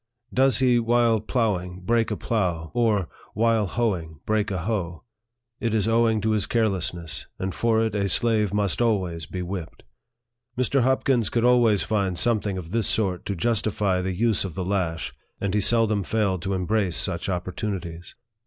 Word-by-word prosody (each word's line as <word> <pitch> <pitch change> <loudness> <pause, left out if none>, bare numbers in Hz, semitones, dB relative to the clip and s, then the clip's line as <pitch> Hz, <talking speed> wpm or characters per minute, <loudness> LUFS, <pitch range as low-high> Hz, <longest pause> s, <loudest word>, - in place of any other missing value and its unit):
Does 135 0 +4
he, 125 -2 +3
while 115 -1 +3
ploughing, 100 -6 -1
break 115 +4 +1
a 105 - -2
plough, 90 -8 -1
or, 110 -7 +1 0.3
while 115 -2 +2
hoeing, 90 -10 -2
break 105 -1 0
a 95 - -2
hoe? 90 -5 -3 0.6
It 115 -2 -1
is 105 -1 +1
owing 115 -1 +2
to 110 - 0
his 105 -2 0
carelessness, 95 -7 -2
and 95 0 -3
for 115 -1 +2
it 110 - -2
a 100 -2 0
slave 110 0 +2
must 105 +1 0
always 90 -9 0
be 90 +3 -5
whipped. 90 -2 -6 0.7
Mr. 130 +2 +2
Hopkins 130 -2 +2
could 115 - 0
always 120 -7 +4
find 95 -1 -1
something 105 -4 0
of 85 -2 -7
this 115 -1 +2
sort 95 -5 0
to 100 - -2
justify 100 -1 0
the 95 0 -2
use 115 +2 +2
of 95 -5 -6
the 95 -2 -3
lash, 90 -4 -2 0.3
and 100 -1 -2
he 105 - +2
seldom 110 -1 +3
failed 100 -3 0
to 95 +2 -2
embrace 95 -1 0
such 85 +4 -1
opportunities. 90 -2 -4
105 Hz, 170 wpm, -24 LUFS, 90-115 Hz, 0.7 s, Does